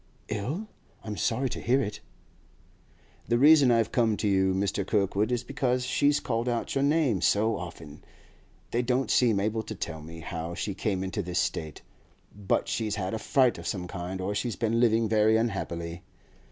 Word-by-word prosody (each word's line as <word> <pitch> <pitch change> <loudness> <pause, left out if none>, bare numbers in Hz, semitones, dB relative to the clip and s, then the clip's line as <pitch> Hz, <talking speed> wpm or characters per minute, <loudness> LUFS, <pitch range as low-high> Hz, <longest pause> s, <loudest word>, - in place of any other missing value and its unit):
'Ill? 135 - -3 0.4
I'm 105 -1 -5
sorry 130 +5 0
to - - -6
hear 130 +3 +2
it.' 105 -6 -3 1.3
'The 120 - +2
reason 145 0 +7
I've 115 -2 +2
come 115 -4 +2
to 105 - -1
you, 95 -1 +3
Mr. 95 +1 0
Kirkwood, 100 +2 0
is 120 0 0
because 125 -1 -1
she's 145 +3 +2
called 120 0 -1
out 120 -1 -2
your 135 - +1
name 140 - +2
so 110 +4 +2
often. 80 -5 -9 0.7
They 120 - +1
don't 125 +2 0
seem 115 -5 +3
able 110 +2 0
to 110 - -7
tell 80 -4 -5
me 80 +1 -10
how 85 +1 -5
she 100 - -3
came 95 -1 -2
into 95 +2 -3
this 90 -1 -4
state, 80 -1 -2 0.5
but 100 -2 0
she's 110 -2 -1
had 95 -1 -3
a 110 - -2
fright 130 0 +2
of - - -7
some 90 -4 -3
kind, 90 +1 -5
or 95 +2 -2
she's 115 +1 -2
been 115 +1 0
living 115 -1 +3
very 110 +1 +4
unhappily. 85 -7 -3
110 Hz, 180 wpm, -28 LUFS, 95-120 Hz, 1.3 s, reason